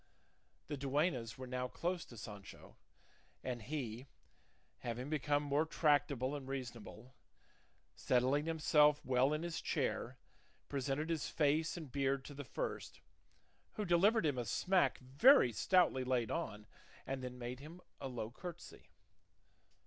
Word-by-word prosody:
The 145 - -4
duennas 135 -4 0
were 130 - -6
now 125 0 -2
close 175 +6 -2
to 120 - -13
Sancho, 105 -2 -10 0.7
and 125 -2 -3
he, 125 -1 -5 0.7
having 125 +4 -4
become 145 -1 +1
more 145 +1 +2
tractable 145 -4 +1
and 135 -2 -7
reasonable, 125 -2 -7 0.8
settling 130 +5 +2
himself 150 -2 +4
well 130 +2 +3
in 150 +2 -1
his 170 -1 -3
chair - - -1 0.5
presented 140 +3 -1
his 160 -3 -1
face 155 +2 +1
and 155 -6 -8
beard 135 -1 0
to 145 - -8
the 145 0 -6
first, 125 - -5 0.7
who 210 - -3
delivered 195 +4 +4
him 140 -4 +1
a 120 - -2
smack 180 - +2
very 135 - +6
stoutly 170 - +3
laid 125 -3 0
on, 105 0 -3 0.4
and 135 -1 -3
then 125 0 -6
made 125 +1 -5
him 155 +5 -10 0.2
a 135 - -4
low 120 -3 -5
curtsey. 175 +6 -9
140 Hz, 135 wpm, -37 LUFS, 125-155 Hz, 0.8 s, very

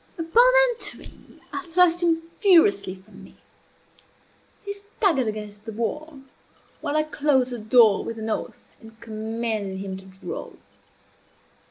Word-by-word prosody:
Upon 450 +10 +4 0.2
entering, 475 - -9
I - - -4
thrust 350 0 +3
him 330 -1 +1 0.2
furiously 205 - +4
from 185 0 -16
me. - - -16 1.3
He 405 - -3
staggered 400 - 0
against 210 -1 -6
the 225 - -6
wall, 285 +6 -4 0.6
while 295 - -2
I 310 - +3
closed 285 -4 +1
the 245 - -5
door 220 -1 +4
with 230 - -6
an 220 0 -5
oath, 220 - -5
and 225 0 -15
commanded 220 -2 -3
him 190 -1 -5
to 190 - -13
draw. 190 0 -8
235 Hz, 135 wpm, -24 LUFS, 215-330 Hz, 1.3 s, Upon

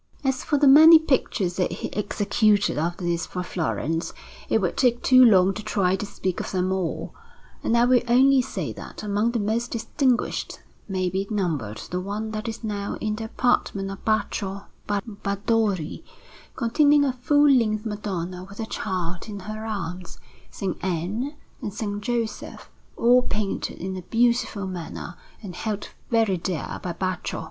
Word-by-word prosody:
As 265 -2 0
for 295 - +1
the 285 0 +4
many 315 +4 +10
pictures 240 - 0
that 180 - 0
he - - -5
executed 205 -2 +1
after 175 +3 -2
this 170 +1 -1
for 180 - -4
Florence, 165 -1 -2 0.4
it 225 - +3
would 180 -4 -1
take 245 -2 +2
too 255 -1 +7
long 195 -5 +6
to 215 - -6
try 190 -3 +1
to 205 +2 -4
speak 185 -2 -3
of - - -4
them 185 0 0
all; 190 -3 -2 0.5
and 235 - +1
I 235 - +5
will 250 0 +4
only 265 +2 +5
say - - -4
that - - -9
among 210 +2 +1
the 235 - 0
most 225 +3 -1
distinguished 240 +2 -1 0.3
may 185 -2 -1
be 195 +2 -2
numbered 160 - -2
the 180 - -1
one 210 +3 -4
that 215 +1 -4
is 225 +1 -5
now 205 -2 -3
in 215 -1 -1
the 225 - -4
apartment 205 -4 0
of 195 - -9
Baccio 205 -2 -1 0.2
Barbadori, 200 -3 -1 0.5
containing 285 +4 +4
a 265 - 0
full 290 +4 +3
length 215 -4 +2
Madonna 185 -4 -4
with 200 +3 -12
a 225 - -2
Child 185 -3 -4
in 205 -2 -6
her 215 +3 -6
arms, 180 -4 -5 0.3
S. - - -10 0.2
Anne, 190 - -2 0.3
and 205 - -4
S. 210 +3 -5 0.2
Joseph, 230 -1 -4 0.3
all 245 +2 +5
painted 210 -5 -3
in 190 +1 -4
a 185 - -5
beautiful 235 0 +1
manner 180 -3 -6 0.3
and 190 -3 -7
held 210 +1 -4 0.2
very 225 -5 +2
dear 170 -3 -4
by 180 - -3
Baccio. 185 0 -3
210 Hz, 165 wpm, -24 LUFS, 185-235 Hz, 0.5 s, many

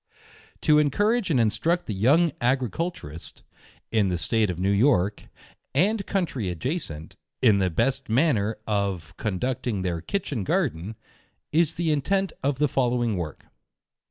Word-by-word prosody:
To 150 0 +5
encourage 205 - +2
and 140 -6 +3
instruct 160 - +1
the 110 - -3
young 145 - +3
Agriculturist, 125 - -2 0.5
in 110 -3 +3
the 90 - 0
state 105 +6 +1
of 90 - -3
New 95 +2 +1
York, 105 -2 +2 0.5
and 195 +7 +2
country 160 - -1
adjacent, 90 - -4 0.2
in 110 -6 +4
the 95 -1 +2
best 130 +10 0
manner 110 -4 +2
of 100 -6 -2
conducting 110 0 -2
their 85 -3 -2
Kitchen 140 - -2
Garden, 90 +3 -1 0.6
is 160 0 +2
the 170 -2 0
intent 190 +7 0
of 140 -1 0
the 150 +1 +3
following 120 -4 +1
work. 80 -5 -5
120 Hz, 135 wpm, -25 LUFS, 95-150 Hz, 0.6 s, To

